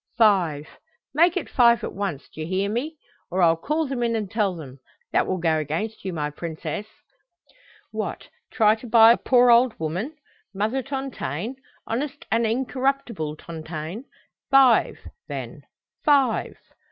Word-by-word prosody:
"Five 175 -10 +3 0.5
make 340 +5 +4
it - - -3
five 235 -3 +4
at - - -4
once, 195 -8 -4
d'ye 155 - -8
hear 190 +3 -1
me? 295 +8 -3 0.3
or 185 +1 +1
I'll 165 -1 +5
call 305 - -1
them 265 -3 -3
in 235 -1 +1
and 210 -3 -3
tell 210 -5 0
them. 140 -5 -10 0.3
That - - +2
will 185 - -1
go 165 -2 +1
against 165 +9 -4
you, 190 - -3
my 150 -3 -3
princess. 170 +7 -5 1.0
What, - - -4 0.2
try 215 -3 +4
to 225 +2 -8
bribe 225 +1 +7
a - - -15
poor 245 -1 +6
old 240 0 +4
woman, 180 - -3 0.4
Mother 220 +7 0
Tontaine, 260 - -4 0.3
honest 275 +4 -4
and 230 0 +2
incorruptible 250 - -1
Tontaine? 160 - -7 0.4
Five, 270 -3 +5 0.3
then, - - -6 0.4
five!" 275 -5 +2
220 Hz, 145 wpm, -24 LUFS, 170-255 Hz, 1.0 s, bribe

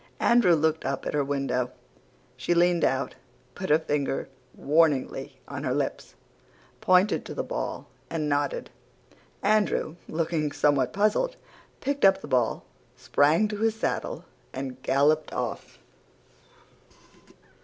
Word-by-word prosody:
Andrew 235 -8 +5
looked 160 0 +1
up 135 0 -3
at - - -3
her 145 -1 +2
window. 135 -3 -1 0.7
She 130 +7 0
leaned 175 0 +3
out, 135 +1 +1 0.4
put 190 - -5
her 150 - +6
finger 145 -3 -2 0.3
warningly 150 -2 +1
on - - -6
her - - 0
lips, - - -3 0.6
pointed 185 +3 +3
to - - -8
the - - -2
ball, - - -4 0.2
and 155 -2 -2
nodded. 145 -1 -1 0.7
Andrew, 205 -6 +1
looking 160 -2 -1
somewhat 145 -3 +2
puzzled, 215 - +1 0.5
picked 280 +1 -2
up 195 -1 +6
the - - -9
ball, 125 -4 0 0.3
sprang 145 - +3
to 210 - -4
his 225 0 +1
saddle, 220 - -3 0.3
and 130 -1 -6
galloped 145 +4 +2
off. - - -4
155 Hz, 125 wpm, -26 LUFS, 140-185 Hz, 0.7 s, her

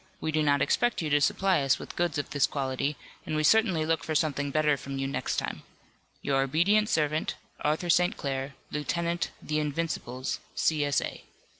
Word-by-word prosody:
We 160 - -2
do 155 0 +1
not 145 -1 +3
expect 240 +4 +1
you 155 - -2
to 145 0 +4
supply 190 +2 +2
us 135 -1 +3
with - - -9
goods 170 -3 0
of 145 - -3
this 145 -2 +3
quality, 140 +1 -2 0.3
and 155 - -3
we 155 - +1
certainly 185 -3 +4
look 165 0 0
for 155 - -3
something 145 -2 +1
better 150 0 +2
from 135 0 -6
you 135 - -1
next 135 - -2
time. - - -3 0.6
"Your 135 -1 +2
obedient 180 +10 +3
servant, 155 0 0 0.2
ARTHUR 155 +3 +1
ST. 180 +5 +3
CLAIR, 135 0 -3 0.2
Lieutenant 170 +3 -1
'The 155 0 -1
Invincibles,' 145 -4 -2 0.2
C. 155 -2 +2
S. 145 -1 +2
A." - - -6
150 Hz, 185 wpm, -28 LUFS, 140-165 Hz, 0.6 s, to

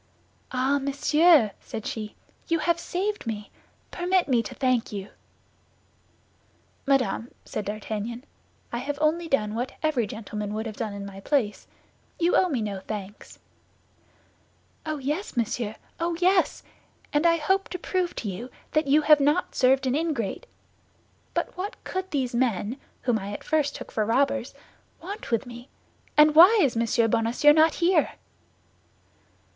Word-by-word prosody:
"Ah, 260 +3 +1
monsieur!" 285 - +4
said 220 - -7
she, 215 -2 -5 0.3
"you 330 - +2
have 340 +1 +1
saved 395 - -3
me; 210 -2 -5 0.4
permit 360 +1 +1
me 250 -4 +3
to 210 - -8
thank 255 -3 +1
you." 200 -1 -6 1.8
"Madame," 250 -4 +1 0.2
said 210 - -4
D'Artagnan, 215 +3 -4 0.5
"I 235 - -1
have 280 +3 -3
only 320 +3 +1
done 215 -8 0
what 245 +3 -3
every 275 -8 +1
gentleman 210 -1 -5
would 220 +1 -3
have 220 -2 -5
done 215 -2 -4
in 200 0 -6
my 195 -1 -9
place; 220 -2 -1 0.5
you 345 +1 +2
owe 370 - +4
me 255 -8 -1
no 200 -2 -3
thanks." 205 0 -8 1.5
"Oh, 310 -1 -2
yes, 295 - -3
monsieur, 225 -1 -1 0.2
oh, 335 0 -1
yes; 365 +1 +2 0.5
and 295 +3 +3
I 335 0 +4
hope 385 +5 0
to 365 - -4
prove 360 0 -2
to 220 - -4
you 200 +6 -5 0.2
that 310 -1 +1
you 300 +3 +4
have 300 0 +6
not 295 +6 +1
served 265 +1 +3
an 255 - +1
ingrate. 305 - -2 0.9
But - - -2
what 380 +4 -4
could 375 0 -4
these 265 -5 -1
men, 235 -1 0 0.3
whom 240 -3 +1
I 200 +1 -6
at - - -7
first 300 -2 0
took - - -8
for 215 - 0
robbers, 270 +3 0 0.4
want 400 +5 -7
with 230 +2 0
me, 240 +1 -11 0.5
and 300 0 +7
why 360 +9 +8
is 280 -10 +3
Monsieur 230 0 +2
Bonacieux 230 +7 +4
not 315 0 +4
here?" 340 -3 +2
270 Hz, 150 wpm, -26 LUFS, 225-320 Hz, 1.8 s, why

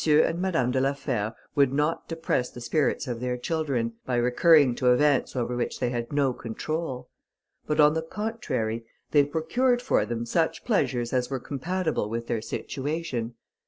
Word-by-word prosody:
and 155 +3 +4
Madame 160 -10 +1
de 130 0 +1
la 135 +1 +2
Fère 120 -6 -2 0.2
would 140 -3 +4
not 150 +4 0
depress 160 -6 -1
the - - -10
spirits 140 +4 0
of 120 -2 -3
their 125 0 -2
children, 130 -5 -1
by 125 - -2
recurring 130 +3 +5
to 125 +1 +3
events 140 +1 +3
over 125 -1 -1
which 120 - -2
they 120 - 0
had 120 -1 -3
no 140 -3 +2
control; 130 +4 -4 0.6
but 150 0 0
on 150 0 +7
the 160 - 0
contrary, 160 - -3 0.3
they 145 -1 +6
procured 205 - +1
for 245 - +2
them 120 0 -3
such 160 +7 0
pleasures 125 - 0
as 125 -1 +1
were 135 -1 -2
compatible 160 - -2
with 115 +1 -3
their 115 -1 -2
situation. 130 0 -3
135 Hz, 170 wpm, -26 LUFS, 120-160 Hz, 0.6 s, on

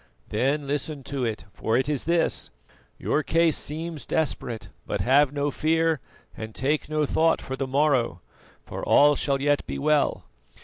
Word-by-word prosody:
Then 140 +7 0
listen 145 0 -3
to 135 0 -3
it, 110 -3 -3
for 110 +1 0
it 130 +1 0
is 145 -3 -1
his: 170 +1 +1 0.5
Your 150 - 0
case 165 0 +2
seems 155 -2 -4
desperate, 120 -7 -2 0.2
but - - -2
have 135 +2 +4
no 145 0 -1
fear, 160 +1 +1 0.4
and 110 -1 -8
take 145 +3 -1
no 155 -1 +1
thought 160 +3 +2
for 130 - -5
the 135 0 -3
morrow, 135 - +1 0.5
for - - -7
all 145 0 +5
shall 140 -1 0
yet 145 +1 +1
be - - -4
well. 150 0 +1
145 Hz, 165 wpm, -25 LUFS, 130-155 Hz, 0.5 s, all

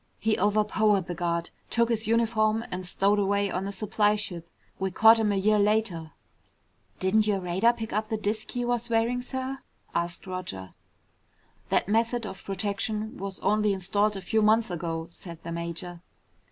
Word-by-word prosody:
He 220 0 +1
overpowered 210 -1 +2
the 175 - -4
guard, 170 0 -2 0.2
took 235 0 +2
his 225 -1 -1
uniform, 225 -1 +2
and 180 0 -3
stowed 200 +3 +2
away 200 0 +1
on 185 +2 -2
a - - -3
supply 210 +1 +1
ship. 175 -5 -6 0.3
We 190 - 0
caught 225 +5 +6
him 215 -2 +2
a - - +1
year 210 +2 +3
later." 200 -7 0 0.9
"Didn't 210 +3 +2
your 200 -2 +2
radar 185 +6 +3
pick 225 -3 -6
up 215 +1 -1
the 220 - 0
disk 215 +1 -2
he 245 -1 -2
was 240 0 -1
wearing, 235 +2 +1
sir?" 260 +1 -4 0.3
asked 170 0 -2
Roger. 180 - -6 1.0
"That - - +2
method 230 +2 +1
of 190 -2 -8
protection 210 +2 -2
was 195 0 -6
only 210 -1 +2
installed 200 +2 +1
a - - -6
few 220 +4 +1
months 215 -1 +3
ago," 165 -1 -3
said 170 -1 -10
the 170 - -5
major. 170 +1 -5
205 Hz, 170 wpm, -27 LUFS, 185-220 Hz, 1.0 s, caught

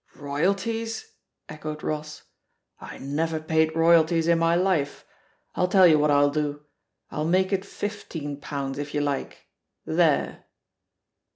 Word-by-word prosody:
Royalties?" 200 - -2 0.3
echoed 155 0 -7
Ross. 155 0 -4 0.6
"I - - -9
never 155 +4 -2
paid 160 0 +1
roy 165 +1 +5
alties 165 0 0
in 170 -1 +4
my 165 0 +3
life. 175 -6 0 0.5
I'll 180 - +1
tell 190 0 +6
you 155 -3 +6
what 150 0 +2
I'll 145 0 +4
do, 145 -1 -2 0.5
I'll 150 - -2
make 185 +3 +2
it 190 0 0
fifteen 170 -8 -6
pounds, 140 -1 -4
if 145 0 -5
you 145 - +1
like. 145 -2 -3 0.4
There - - +1
160 Hz, 135 wpm, -25 LUFS, 145-180 Hz, 0.6 s, tell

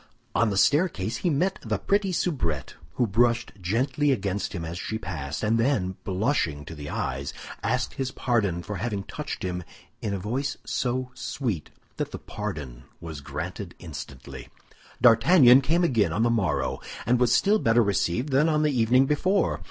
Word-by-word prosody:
On 115 -1 +3
the 100 - -1
staircase 120 - +2
he 180 - 0
met 175 +6 +1
the - - -1
pretty 200 -1 +1
soubrette, 85 - -1 0.2
who 125 - +2
brushed 115 +2 +2
gently 130 +10 +1
against 100 -5 -1
him 85 -4 -4
as 85 +2 -5
she 110 - -3
passed, 80 -8 -5
and 110 +2 +2
then, 110 -7 +1
blushing 95 - 0
to 80 - -8
the 75 -1 -7
eyes, 70 +1 -3 0.3
asked 125 +2 -1
his 135 -2 -2
pardon 105 -10 0
for 105 +1 -5
having 100 0 -2
touched - - -6
him 90 -1 -3 0.4
in 105 - -2
a 100 - -1
voice 125 +9 -2
so 125 0 -1
sweet 110 - -3 0.3
that - - -2
the - - -6
pardon 65 -5 -6
was 80 -4 -7
granted - - -6
instantly. 65 -2 -9 0.5
D'Artagnan 125 +3 +7
came 165 +7 +2
again 115 - +2
on 105 +7 +1
the 120 - +3
morrow, 80 - 0 0.3
and 120 +2 +3
was 125 -1 +3
still 205 - +4
better 115 - +4
received 100 - 0
than 140 +4 +3
on 155 -1 +2
the 150 - +3
evening 125 +3 +4
before. 185 +8 +1
115 Hz, 170 wpm, -26 LUFS, 90-135 Hz, 0.5 s, D'Artagnan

